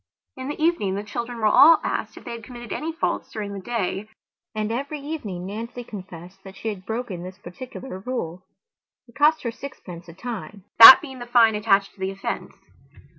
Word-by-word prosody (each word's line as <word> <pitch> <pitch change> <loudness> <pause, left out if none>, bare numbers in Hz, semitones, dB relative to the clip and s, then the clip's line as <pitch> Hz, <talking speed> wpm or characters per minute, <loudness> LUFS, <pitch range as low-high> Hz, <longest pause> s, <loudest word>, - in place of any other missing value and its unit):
In 260 0 -7
the 295 - -5
evening 310 - +1
the 200 - -4
children 235 +3 -5
were 220 - -2
all 305 +9 +7
asked - - -3
if - - -11
they 240 - -6
had 230 -1 -7
committed 240 0 -8
any 320 +2 -3
faults 325 - -3
during 205 -2 -5
the 200 - -6
day, 210 -1 -3 0.5
and 215 0 -2
every 280 +5 -4
evening 255 - -6
Nancy 230 +5 -6
confessed 185 -3 -11
that 195 0 -12
she 220 - -4
had 190 -3 -8
broken 225 -6 -4
this 185 +1 -9
particular 205 +3 -9
rule. 190 -6 -5 0.7
It 235 - -20
cost 300 +4 +3
her 235 - -2
sixpence 185 -10 -10
a - - -11
time, 210 -2 -7 0.2
that 260 +8 +13
being 265 -4 -9
the 240 - -8
fine 235 -2 +5
attached 205 -2 +1
to - - -26
the 190 0 -2
offence. 195 0 -5
225 Hz, 195 wpm, -23 LUFS, 195-250 Hz, 0.7 s, that